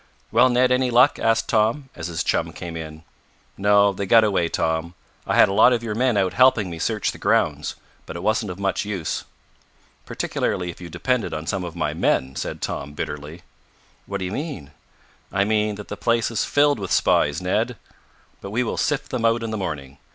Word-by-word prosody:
"Well, 125 +3 +5
Ned, 125 +1 +3
any 125 0 +2
luck?" 125 +4 +4
asked 115 0 +1
Tom, 115 +6 +1
as 80 - -5
his 85 -2 -2
chum - - 0
came 85 -1 -7
in. 80 -1 -8 0.5
"No, 100 0 +4
they 100 +1 -4
got 115 +2 +6
away, 95 -5 +1
Tom. 80 +2 -1 0.3
I - - +1
had - - +7
a 95 - -2
lot 125 +5 +6
of 120 -1 -1
your 110 -2 -3
men 120 0 +1
out 95 -2 +1
helping 120 -7 +4
me 85 - -7
search - - 0
the - - -12
grounds, - - +1 0.3
but - - -7
it 85 - -6
wasn't 110 0 0
of 90 - -6
much 100 0 -1
use." 100 -6 -3 0.8
"Particularly 90 -1 -2
if 85 - -16
you 85 - -8
depended 100 +3 -1
on 80 +1 -5
some 95 +2 -2
of 85 -1 -7
my 85 - -1
men," 65 +1 0
said - - -5
Tom 70 +1 -4
bitterly. 75 +4 -6 0.6
"What 100 - -3
do 95 - -4
you 90 - -4
mean?" 140 - -5 0.6
"I 95 - +2
mean 105 0 +1
that 105 0 -9
the - - -5
place 115 0 +1
is 110 - 0
filled 145 -3 +3
with 95 -2 -5
spies, 75 +1 +2
Ned! 90 0 -1 0.6
But 100 - -7
we 115 +5 0
will 115 - -3
sift 150 -2 -1
them 125 -3 -2
out 115 0 +2
in 115 - -3
the - - -2
morning. 70 -8 -5
100 Hz, 210 wpm, -23 LUFS, 85-115 Hz, 0.8 s, had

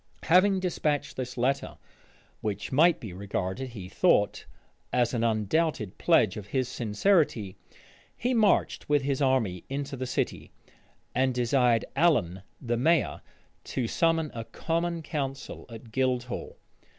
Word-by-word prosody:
Having 185 +2 +4
despatched 155 -5 -1
this 125 -1 -5
letter, 135 +3 0 0.6
which 105 -2 -4
might 160 +5 +4
be 105 -6 -8
regarded, 100 +5 -3
he 105 -6 -8
thought, - - +2 0.4
as 120 -1 +1
an 115 -2 0
undoubted 110 - 0
pledge 115 - +3
of 105 -1 -7
his 130 +2 -1
sincerity, 120 - +1 0.6
he 250 +2 0
marched 215 -9 +2
with 145 -2 +3
his 140 0 -1
army 120 -10 +1
into 140 +1 -3
the 130 0 -4
city, - - -2 0.6
and 130 0 +1
desired 120 -1 +2
Allen, 105 - +2 0.2
the 120 -2 -1
mayor, 160 +5 +2 0.4
to 125 - -2
summon 165 +2 +1
a 115 - -5
common 170 +5 -2
council 140 -3 -5
at 115 0 -11
Guildhall. 125 0 -2
130 Hz, 130 wpm, -28 LUFS, 115-155 Hz, 0.6 s, Having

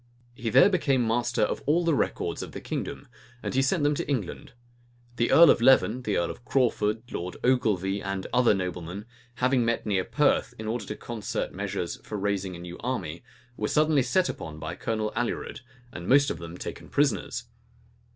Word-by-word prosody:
He 120 -1 -4
there 130 - +7
became 140 -10 +2
master 115 -1 +1
of - - -1
all 170 +4 +3
the 165 - +3
records - - -1
of - - -7
the - - -5
kingdom; - - -5 0.4
and - - -3
he 135 - +3
sent 145 +4 +1
them 145 +1 +3
to 145 - -4
England. 120 -9 -3 0.6
The 120 +1 +2
earl 170 -1 +8
of - - +1
Leven, 130 -1 +5
the 105 -5 -1
earl 85 - 0
of - - -12
Crawford, 115 -4 +1
Lord 90 +1 -5
Ogilvy, 100 -6 +1
and 95 -1 -3
other 125 -4 +4
noblemen, 90 +1 -4 0.3
having 125 0 +2
met 115 0 0
near 95 -3 +1
Perth, - - +1
in 110 - -7
order 110 -1 -2
to 105 - -5
concert 115 -2 -4
measures - - -3
for 105 - -5
raising 100 -2 -1
a - - -9
new 85 0 -8
army, 95 -10 -3 0.3
were 105 - -2
suddenly 155 -2 +3
set 170 +9 +2
upon 75 -1 -6
by 80 +2 -5
Colonel 110 0 -2
Alured, 120 +1 -3 0.3
and 85 +1 -7
most 140 +2 +5
of - - -5
them 85 +1 -8
taken - - -7
prisoners. - - 0
115 Hz, 190 wpm, -27 LUFS, 95-130 Hz, 0.6 s, earl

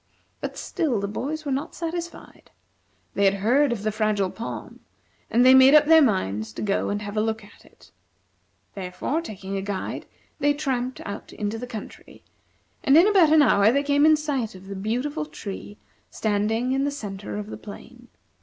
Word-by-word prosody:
But - - -6
still 270 -10 -1
the 200 - -2
boys 300 +9 -4
were 280 - -2
not 270 +2 -3
satisfied. 340 +1 -6 0.6
They 200 - +1
had 195 0 +4
heard 245 +8 +2
of 220 -4 -3
the 215 - 0
Fragile 210 -3 0
Palm, 230 - -7 0.5
and 240 +2 +3
they 260 - +8
made 265 +2 +8
up 300 -1 +7
their 320 +1 +7
minds 110 - 0
to - - -5
go 200 -1 0
and 205 +1 -2
have 205 0 -6
a - - +3
look 220 0 -2
at 205 - -18
it. - - -21 0.8
Therefore, 195 - -3
taking 195 - -6
a - - -2
guide, 195 -1 -5 0.3
they 290 0 +2
tramped 260 -3 -2
out 200 +1 -7
into 210 +1 -3
the 250 - -6
country, 225 -4 -10 0.6
and 285 -2 +5
in 350 +5 +7
about 375 -7 +5
an 310 -1 +6
hour 205 -5 +4
they 280 +3 +1
came 285 0 +2
in 310 - +7
sight 280 -9 -3
of 185 +1 -13
the 195 0 -7
beautiful 255 +10 -2
tree 205 -5 -8 0.3
standing 220 +4 0
in 270 +1 +1
the 285 - +1
centre 205 -8 -6
of 210 - -4
the - - -5
plain. 240 +3 -12
230 Hz, 190 wpm, -24 LUFS, 205-285 Hz, 0.8 s, they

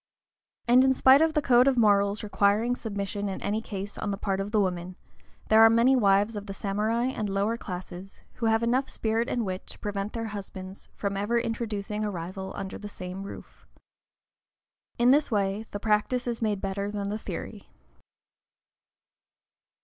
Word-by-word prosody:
And 250 +2 +6
in 265 0 +3
spite 265 +3 +6
of 320 0 +3
the 300 -2 +1
code 250 0 +5
of 270 -2 +3
morals 205 -2 +3
requiring 210 +3 +2
submission 200 -2 -4
in 190 - -4
any 215 +2 -1
case 200 -2 -6
on 210 - -2
the 200 - -2
part 195 -1 -2
of 195 +1 -3
the 215 0 +1
woman, 180 -2 -2 0.5
there 220 +1 +7
are 225 - +9
many 235 +4 +4
wives 205 -1 +3
of 205 0 -6
the 195 - -6
samurai 215 +5 -1
and 215 -5 -3
lower 200 +3 0
classes 185 -2 -8
who 230 - 0
have 225 +1 +2
enough 255 +3 +1
spirit 225 +3 -1
and 235 -3 -1
wit 185 -1 -5
to - - -9
prevent 200 0 -4
their 230 -1 -3
husbands 195 -2 -8
from 200 -1 -3
ever 205 +4 0
introducing 215 -3 -2
a 210 - -1
rival 190 +1 -6
under 195 -1 -6
the 205 - -7
same 185 -1 -7
roof. 200 - -11 1.3
In 240 +1 +5
this 290 +2 +3
way 205 0 -1
the 205 - -5
practice 215 +4 +1
is 240 -1 -3
made 210 -3 0
better 200 +1 -2
than 205 -1 -3
the 210 +1 -3
theory. 210 -1 -7
210 Hz, 180 wpm, -27 LUFS, 195-230 Hz, 1.3 s, are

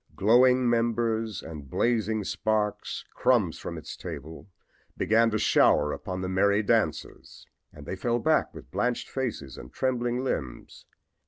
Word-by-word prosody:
Glowing 125 +3 +4
embers 115 -2 0
and 75 -4 -9
blazing 110 - 0
sparks 105 0 -2
crumbs 105 -10 +2
from - - -6
its - - -8
table 80 +7 -8 0.5
began 115 +1 +3
to 110 - 0
shower 75 -6 +3
upon 95 -1 -5
the 95 - -3
merry 100 +3 +2
dancers, - - -2 0.3
and 75 -1 -13
they 95 - -4
fell 120 +5 0
back 155 +4 +1
with - - -13
blanched 125 0 -1
faces 120 - -4
and - - -11
trembling 125 -1 -1
limbs. 65 - -5
110 Hz, 140 wpm, -27 LUFS, 95-120 Hz, 0.5 s, Glowing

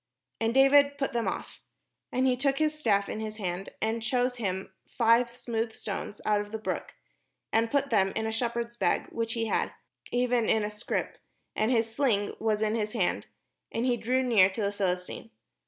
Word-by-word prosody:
And 225 0 +1
David 280 +2 +5
put 275 -3 -2
them 235 -1 0
off - - -5 0.5
him. - - -4
And 260 - +3
he 255 - +3
took 270 +2 +1
his 310 -1 +2
staff 210 -10 +1
in - - -4
his 215 -1 -5
hand, 185 -2 -3
and 225 +1 0
chose 245 +2 0
him 190 -4 -3
five 235 +1 +3
smooth 230 -2 -3
stones 205 0 -5
out 210 -1 +3
of 205 - -8
the 220 - -2
brook, 215 - -4 0.6
and 225 +1 +3
put 280 0 0
them 195 -3 +3
in 220 - -1
a 220 - -1
shep 235 +1 0
herd's 235 0 -3
bag - - 0
which 230 -1 -2
he 230 -1 -1
had, - - 0 0.4
even 245 -1 +2
in 220 - +3
a 210 - -2
scrip; 210 +1 -3 0.4
and 215 - +1
his 225 -2 +1
sling 225 -6 +1
was 215 -1 +1
in 215 0 +1
his 215 -2 -1
hand; 195 -7 0 0.4
and 230 - -1
he 250 -1 +3
drew 255 +3 0
near 215 -7 +5
to 195 +3 -4
the 200 - +1
Philistine. 185 +2 -2
225 Hz, 205 wpm, -29 LUFS, 210-245 Hz, 0.6 s, David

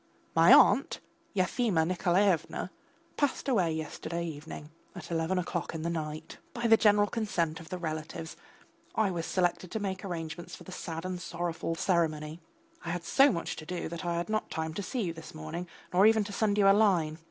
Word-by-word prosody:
My - - +7
aunt, - - +6 0.4
Yefimya 185 -2 +2
Nikolaevna, 180 +1 +1 0.5
passed 285 -1 0
away 190 -11 +2
yesterday 160 +2 -4
evening 150 -1 -8 0.2
at - - -9
eleven 165 +3 0
o'clock 175 -1 -2
in 160 - -4
the 170 - -1
night. 155 -2 -5 0.2
By 240 -1 -3
the 225 -1 +7
general 210 -2 +4
consent 190 -8 -1
of 165 - -12
the 185 - -4
relatives 160 -1 -5 0.6
I 215 -3 +2
was 170 -2 -3
selected 180 0 0
to 220 - -3
make 190 -2 -3
the - - -6
arrangements 165 -1 -5
for - - -13
the - - -11
sad 165 -1 -5
and 185 -1 -4
sorrowful 170 -1 -3
ceremony. 160 -3 0 0.4
I 170 - -5
had 175 0 -3
so 275 +10 +5
much 170 - -3
to 155 - -8
do 180 -1 -3
that 170 +1 -6
I 170 -1 -1
had 170 0 -2
not 215 0 -1
time 160 0 -3
to 200 - -3
see 230 +5 -2
you 170 -3 -2
this 160 -1 -11
morning, 160 +3 -5 0.3
nor 190 +4 +6
even 220 -1 +4
to 205 0 -7
send 205 0 +1
you 200 -1 +5
a 195 - +8
line. 175 -7 +2
175 Hz, 200 wpm, -30 LUFS, 160-200 Hz, 0.6 s, a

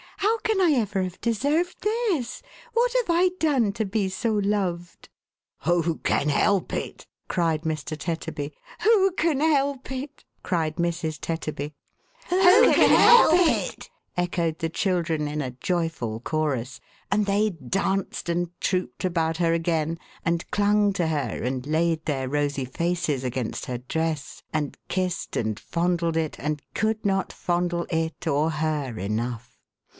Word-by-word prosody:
How 435 +3 +1
can 440 -3 0
I 355 -4 +4
ever 200 -3 -1
have 185 0 -6
deserved 290 - 0
this! 420 - -1 0.3
What 475 +1 +3
have - - +1
I 345 +2 +4
done 270 -10 +2
to 220 - -1
be 195 -1 0
so 225 +4 -1
loved? 195 -4 -2 0.2
" - - -68
" - - -58
Who 170 -1 +1
can 150 - +1
help 195 +5 +2
it! - - -4
" - - -49
cried 165 -3 +1
Mr. 155 -2 -3
Tetterbv. 155 -2 -4 0.2
" - - -19
Who 415 -3 +5
can 330 -5 +1
help 280 -4 +1
it! 275 +2 -6
" - - -44
cried 160 -3 -1
Mrs. 170 -2 -1
Tetterby. 155 -3 -4 0.6
"Who 370 +4 +6
can - - +6
help 475 -8 +7
it!"" - - -2 0.3
echoed 170 -2 0
the 165 -2 -1
children, 165 -4 0
in 150 +1 -3
a 130 -3 -3
joyful 145 -6 -2
chorus. 130 -3 -2 0.3
And 205 0 +2
they 205 +2 +2
danced 190 +6 -2
and 170 0 0
trooped 185 0 -1
about 165 -3 0
her 165 -1 +2
again, 165 -1 0 0.3
and 170 0 -1
clung 205 0 +3
to 175 -3 0
her, 145 -7 -2
and 130 +1 -2
laid 160 +1 +1
their 135 -4 -1
rosy 145 -1 -1
faces 165 0 -1
against 125 -2 -3
her 125 - -2
dress, 150 +1 -3
and 150 -2 -2
kissed 185 -1 -2
and 110 -2 -1
fondled 170 -1 0
it, 160 -2 -2
and 150 0 -2
could 220 0 -1
not 195 -1 +1
fondle 175 -1 -1
it, 160 0 -2
or 150 +1 +2
her, 150 -6 -2
enough. 115 +4 -3
170 Hz, 155 wpm, -25 LUFS, 155-210 Hz, 0.6 s, help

